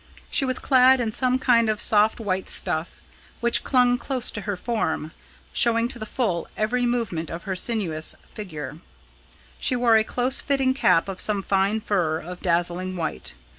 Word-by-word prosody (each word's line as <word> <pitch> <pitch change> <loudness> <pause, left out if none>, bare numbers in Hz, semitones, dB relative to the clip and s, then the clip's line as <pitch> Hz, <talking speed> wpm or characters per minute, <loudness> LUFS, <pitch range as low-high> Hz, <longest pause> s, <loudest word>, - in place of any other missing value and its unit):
She 275 - +4
was 255 -1 -1
clad 260 -1 +5
in 230 -3 -1
some 255 +3 +1
kind 235 -3 +3
of 215 -1 -1
soft 215 0 +3
white 190 -4 -2
stuff, 160 +1 -2 0.4
which 235 0 +2
clung 245 -2 +3
close 255 -2 -1
to 210 - -6
her 205 -1 -3
form, 180 -8 -2 0.4
showing 230 0 +3
to 240 - -8
the 215 - -6
full 205 -9 -1
every 245 +3 0
movement 220 -10 -2
of 165 +1 -6
her 190 - -3
sinuous 180 -7 -2 0.2
figure. 155 -8 -7 0.8
She 255 - 0
wore 240 -2 +4
a 220 - +3
close 250 +4 -1
fitting 270 -2 +1
cap 185 -10 +3
of 190 -1 -3
some 205 -2 -1
fine 200 +3 +1
fur 180 -8 0
of 180 +3 -8
dazzling 175 +1 0
white. 160 - -3
215 Hz, 170 wpm, -24 LUFS, 180-245 Hz, 0.8 s, clad